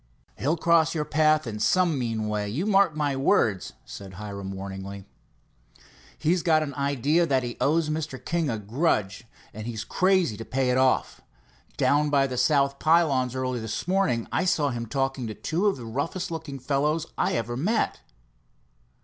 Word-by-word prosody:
"He'll 155 +6 +1
cross 165 0 +3
your 150 -1 -1
path 155 0 +3
in 110 -3 -5
some 165 +7 +2
mean 115 -3 -2
way, 105 -1 -2
you 145 - -2
mark 195 -6 +3
my 145 -2 0
words," 110 -7 +1
said 95 -2 -9
Hiram 100 -1 -6
warningly. 95 0 -7 1.1
"He's 170 +3 +1
got 160 -2 +3
an 140 -2 -5
idea 140 +4 +1
that 130 -3 +1
he 120 -1 -4
owes 160 +2 +2
Mr. 155 -3 -3
King 165 +2 -1
a 115 - -1
grudge, 105 - -1 0.3
and 110 +2 -7
he's 110 -3 -4
crazy 185 - +2
to 115 - -6
pay 130 +1 0
it 125 - +2
off. 130 -1 +1 0.6
Down 145 +1 +3
by 140 -2 +3
the 130 -2 -4
south 140 +2 +2
pylons 145 -6 +2
early 130 -1 -2
this 110 +7 -4
morning, 185 -12 +1
I 175 - +1
saw 150 -6 +2
him 120 -1 -4
talking 135 0 -2
to 110 - -6
two 175 +6 -1
of 200 - +1
the 120 - -8
roughest 160 - -3
looking 160 -4 -5
fellows 150 +4 0
I - - 0
ever 115 +1 -2
met. 205 - 0
140 Hz, 175 wpm, -26 LUFS, 115-160 Hz, 1.1 s, cross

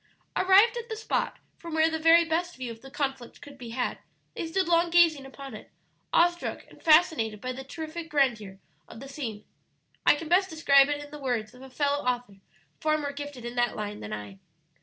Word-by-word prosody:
Arrived 395 +6 +5
at 475 0 -6
the 440 - -3
spot 440 - -2 0.2
from 335 -2 -6
where 320 0 +4
the 320 - -2
very 330 +1 +6
best 345 +2 -1
view 255 -2 -5
of 225 0 -11
the 270 - -12
conflict 270 -4 -4
could 285 -1 -12
be 245 -4 -9
had, 245 +2 -2 0.3
they 330 - -4
stood 370 +2 0
long 340 0 +3
gazing 330 -5 +4
upon 270 -1 -10
it, 215 - -10 0.4
awestruck 345 0 +1
and - - -17
fascinated 305 - +4
by 255 +4 -4
the 265 +1 -7
terrific 320 +4 -7
grandeur 235 -10 0 0.3
of 225 - -11
the 275 - -9
scene. 235 -7 -6 0.6
I - - +6
can 315 +2 -7
best 375 +3 +3
describe 280 -3 +5
it 290 0 -2
in 290 - -13
the 295 - -8
words 240 -6 -2
of 250 - -15
a 265 - -11
fellow 285 +2 0
author 245 -5 -2 0.4
far 310 0 +1
more 290 -2 -3
gifted 285 -3 -8
in 240 - -5
that 240 0 +1
line 210 -1 -5
than 105 - -8
I. 105 -2 -7
285 Hz, 210 wpm, -27 LUFS, 245-325 Hz, 0.6 s, very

